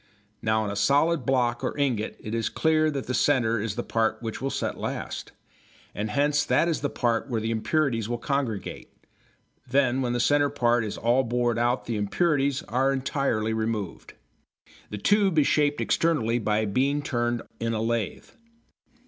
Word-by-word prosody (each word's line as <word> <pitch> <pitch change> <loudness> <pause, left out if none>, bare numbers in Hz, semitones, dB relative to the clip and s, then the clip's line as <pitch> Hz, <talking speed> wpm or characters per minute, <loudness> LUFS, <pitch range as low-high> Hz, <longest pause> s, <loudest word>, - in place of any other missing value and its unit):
Now 110 -1 +1
in 100 - -3
a - - -4
solid 145 +10 +2
block 120 -3 +1
or - - -2
ingot 125 -7 -1
it 110 - -7
is 115 -1 0
clear 155 -1 +2
that 140 -3 -3
the 125 - -3
centre 120 -6 +2
is 105 -2 -3
the 120 - -3
part 110 -1 0
which 115 -1 -5
will 135 - -1
set - - -3
last, - - -5 0.6
and 105 +1 -3
hence 145 +5 +2
that 165 - +2
is 165 - -1
the 145 - 0
part 120 +1 -1
where 115 -3 0
the 110 +1 -2
impurities 115 -1 0
will 120 - -1
congregate. 130 -5 -3 0.8
Then, 130 -1 +2
when 120 -2 -1
the 120 - -1
centre 145 +3 +3
part 120 -2 +2
is 105 - -4
all 120 +3 +2
bored 120 -1 0
out 120 +2 +1
the 115 -2 -2
impurities 140 - +1
are 135 0 +1
entirely 130 -5 -1
removed. 110 -4 -3 0.7
The 105 - -5
tube 195 - +2
is 150 - +5
shaped 145 -1 +2
externally 120 -8 +1
by 110 0 0
being 135 +8 0
turned 120 -3 -1 0.2
in 115 0 -1
a - - -1
lathe. 115 -1 -2
120 Hz, 175 wpm, -26 LUFS, 110-140 Hz, 0.8 s, is